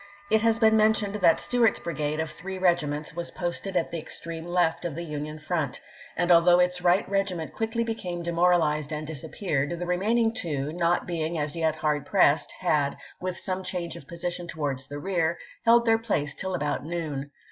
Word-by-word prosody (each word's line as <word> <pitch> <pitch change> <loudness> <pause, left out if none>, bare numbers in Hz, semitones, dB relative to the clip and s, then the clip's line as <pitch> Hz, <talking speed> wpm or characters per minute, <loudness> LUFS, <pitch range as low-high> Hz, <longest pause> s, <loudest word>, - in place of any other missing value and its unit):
It 220 0 +4
has 225 0 +3
been 220 -1 +5
mentioned 215 -2 +3
that 170 -5 +4
Stuart's 240 -3 +2
brigade 155 -2 -2
of 160 -1 -2
three 190 +4 -6
regiments 155 -5 +1
was 170 0 -3
posted 180 +2 -3
at 165 - 0
the 170 - -3
extreme 165 +1 -6
left 175 -2 +1
of 170 -4 -3
the 170 - -4
Union 150 -1 -5
front; 155 -3 -2 0.4
and 175 +1 +2
although 175 +1 +7
its 180 0 +2
right 180 +2 +3
regiment 195 -5 -1
quickly 225 +1 -1
became 180 -7 -4
de 170 - -2
moralized 165 -4 +2
and 155 0 -3
disappeared, 150 -1 -2
the 175 - -3
remaining 220 +6 +2
two, 155 - -2
not 175 0 +1
being 165 -1 -2
as 150 0 -2
yet 160 -2 +1
hard 150 -2 -1
pressed, 160 -6 +3
had, 150 -6 +1 0.2
with 185 0 -3
some 190 -1 -3
change 180 -2 -4
of 140 - -11
position 175 0 -4
towards 140 -5 -3
the 145 - -6
rear, 170 0 0 0.3
held 235 +1 +6
their 225 -1 +4
place 150 -11 -1
till 190 -1 -3
about 150 -2 -1
noon. 150 -4 -4
170 Hz, 190 wpm, -27 LUFS, 155-185 Hz, 0.4 s, although